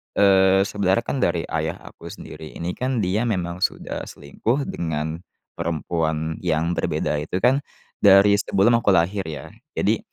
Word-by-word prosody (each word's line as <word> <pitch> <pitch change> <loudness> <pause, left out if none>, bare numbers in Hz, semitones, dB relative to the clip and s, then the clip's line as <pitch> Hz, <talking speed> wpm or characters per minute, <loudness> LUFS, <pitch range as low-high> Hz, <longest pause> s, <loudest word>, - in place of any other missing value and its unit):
eee, 95 -1 +5
sebenarnya, 100 +2 0
kan, 135 - -3
dari 85 -6 +1
ayah 80 0 -1
aku - - -12
sendiri 80 - -10
ini, 85 +1 -3
kan, 125 -2 -1
dia 105 +6 0
memang 90 -4 -2
sudah 95 - -2
selingkuh 115 - -2
dengan 80 0 -3 0.4
perempuan 80 -1 -2
yang 85 -1 0
berbeda, 75 -3 -1
itu, 85 +5 -4
kan, 130 +3 +4 0.4
dari 100 0 +6
sebelum 110 +6 +3
aku 100 -4 +3
lahir, 90 +2 +1
ya. 75 -4 -7 0.2
Jadi, - - +1
90 Hz, 150 wpm, -23 LUFS, 80-100 Hz, 0.4 s, dari